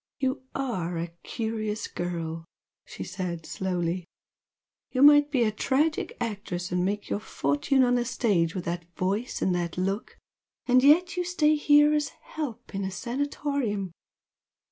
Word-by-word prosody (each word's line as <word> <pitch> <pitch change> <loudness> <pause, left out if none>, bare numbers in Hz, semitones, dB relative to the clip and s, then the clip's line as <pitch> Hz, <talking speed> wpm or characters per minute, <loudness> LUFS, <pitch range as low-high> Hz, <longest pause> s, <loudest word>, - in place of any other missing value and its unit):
"You 265 0 0
ARE 185 -11 -2
a 170 0 -4
curious 220 -1 -3
girl!" 165 -2 -4 0.4
she - - -7
said, 175 -4 -4
slowly 180 -2 -2 0.8
"You 260 +1 +3
might 290 0 +8
be 265 -4 +2
a 215 - +2
tragic 280 +8 0
actress 195 -5 -4
and 180 0 +1
make 205 +2 -1
your - - -1
fortune 150 - +1
on 245 0 +3
the 245 -1 +2
stage, 195 -9 +1
with 180 - -4
that 175 0 -4
voice 200 +7 -1
and 185 - +2
that 175 -1 -2
look! 195 +4 -2 0.5
And 255 0 +4
yet 345 +6 +5
you 360 - +1
stay 325 -4 +3
here 295 0 +5
as 300 -1 +1
'help' 275 -9 -6
in 195 0 -2
a 190 - -1
Sanatorium! 245 - -2
215 Hz, 150 wpm, -27 LUFS, 180-275 Hz, 0.8 s, might